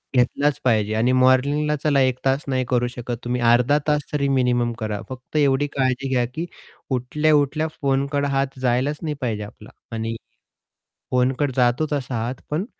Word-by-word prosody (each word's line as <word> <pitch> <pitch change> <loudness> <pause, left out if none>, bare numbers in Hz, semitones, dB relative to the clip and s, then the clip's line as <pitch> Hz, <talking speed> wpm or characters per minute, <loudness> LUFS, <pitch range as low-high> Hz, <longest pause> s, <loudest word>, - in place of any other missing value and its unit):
घेतलाच 140 +4 +2
पाहिजे 110 -4 +2
आणि 115 +3 +2
मॉर्निंगला 135 +4 +3
चला 145 -3 +3
1 130 -1 +2
तास 135 +2 +2
नाही 130 -1 0
करू 125 -1 +2
शकत 120 -1 -5
तुम्ही 125 +1 -2
अर्धा 120 +4 +4
तास 150 -1 +2
तरी 140 -2 0
मिनिमम 125 -3 +2
करा, 105 -2 -3
फक्त 130 +3 -10
एवढी 145 0 +3
काळजी 130 0 0
घ्या, 125 -2 +2
की 140 +8 -5 0.5
उठल्या-उठल्या 150 +4 +1
फोनकड 140 +1 +1
हात 135 -1 -1
जायलाच 130 +4 +1
नाही 155 -2 -3
पाहिजे 110 -4 -2
आपला. 105 - -12 0.2
आणि 115 0 -3 1.0
फोनकडं 130 +3 +1
जातो 125 +4 +2
तसा 135 -3 -2
हात 125 +2 -3
पण 155 +6 -1
130 Hz, 160 wpm, -22 LUFS, 125-145 Hz, 1.0 s, अर्धा